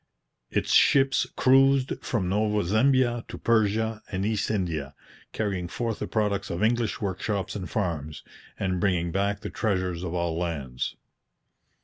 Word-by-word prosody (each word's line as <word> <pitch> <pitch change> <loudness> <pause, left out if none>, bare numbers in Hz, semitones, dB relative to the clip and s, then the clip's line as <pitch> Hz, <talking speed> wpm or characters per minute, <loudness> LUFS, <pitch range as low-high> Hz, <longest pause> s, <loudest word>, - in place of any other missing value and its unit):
Its - - -1
ships 135 -1 +4
cruised 135 0 +4
from 105 -7 -1
Nova 105 +2 +1
Zembia 120 +3 +3
to - - -7
Persia 110 -1 +1
and 95 0 -1
East 105 -2 0
India, 80 -9 -2 0.4
carrying 95 -5 -2
forth 115 +4 -3
the - - -3
products 105 -3 -1
of 85 +5 -2
English 115 -1 +1
workshops 100 -1 -2
and 95 -3 -5
farms, 80 -8 -3 0.3
and 95 -2 -1
bringing 85 -2 +1
back 100 +2 0
the - - -6
treasures 95 -5 -1
of 90 -1 -4
all 85 -2 -1
lands. 70 -7 -3
100 Hz, 140 wpm, -26 LUFS, 90-110 Hz, 0.4 s, ships